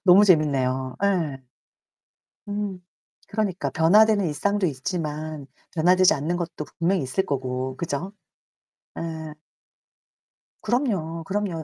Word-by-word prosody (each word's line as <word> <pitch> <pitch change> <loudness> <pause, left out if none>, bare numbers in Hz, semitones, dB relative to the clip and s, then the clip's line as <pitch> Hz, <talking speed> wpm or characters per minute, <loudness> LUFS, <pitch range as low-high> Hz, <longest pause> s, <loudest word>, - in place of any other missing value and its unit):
너무 190 +3 +8
재밌네요. 130 -7 +2
예. 165 -9 0 1.1
음 205 -3 -3 0.5
그러니까 190 -9 -1
변화되는 205 +6 +5
일상도 200 +6 0
있지만 155 0 -4 0.3
변화되지 180 +4 +5
않는 155 +5 -1
것도 170 -3 -4
분명히 175 -1 +2
있을 135 +9 -1
거고 130 -3 -3
그죠? 170 +4 -3 0.9
예. 160 -2 -5 1.3
그럼요, 185 - -1
그럼요. 190 -5 -2
165 Hz, 235 characters per minute, -24 LUFS, 145-195 Hz, 1.3 s, 너무